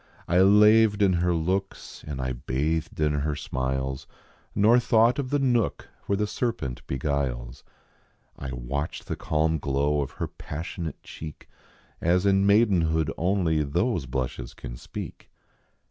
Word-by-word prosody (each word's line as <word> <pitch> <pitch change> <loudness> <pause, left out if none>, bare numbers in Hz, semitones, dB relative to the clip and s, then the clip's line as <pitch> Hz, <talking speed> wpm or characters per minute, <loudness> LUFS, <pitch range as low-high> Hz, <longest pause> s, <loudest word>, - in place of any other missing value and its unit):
I 90 +2 +4
laved 105 +1 +6
in 95 -2 +4
her 90 0 +2
looks 95 +4 -3
and 70 -3 -5
I 65 -1 -2
bathed 75 +7 -2
in 75 -1 +2
her 75 +1 -1
smiles, 65 0 -3 0.5
Nor 110 +4 +5
thought 120 +1 +3
of 130 -3 -2
the 145 - +2
nook 125 -5 0 0.2
where 100 - +1
the 105 - +1
serpent 105 - -3
beguiles; 65 -3 -2 0.7
I 65 - -6
watched 60 +5 -4
the - - -3
calm 80 +1 0
glow 70 +2 +1
of 70 - -4
her - - -3
passionate 80 +2 -6
cheek, 75 -2 -9 0.5
As 90 +3 +2
in 100 0 +4
maidenhood 85 -7 +3
only 85 -3 +1
those 85 - 0
blushes 65 -1 -4
can - - -8
speak. - - -8
80 Hz, 140 wpm, -26 LUFS, 70-100 Hz, 0.7 s, laved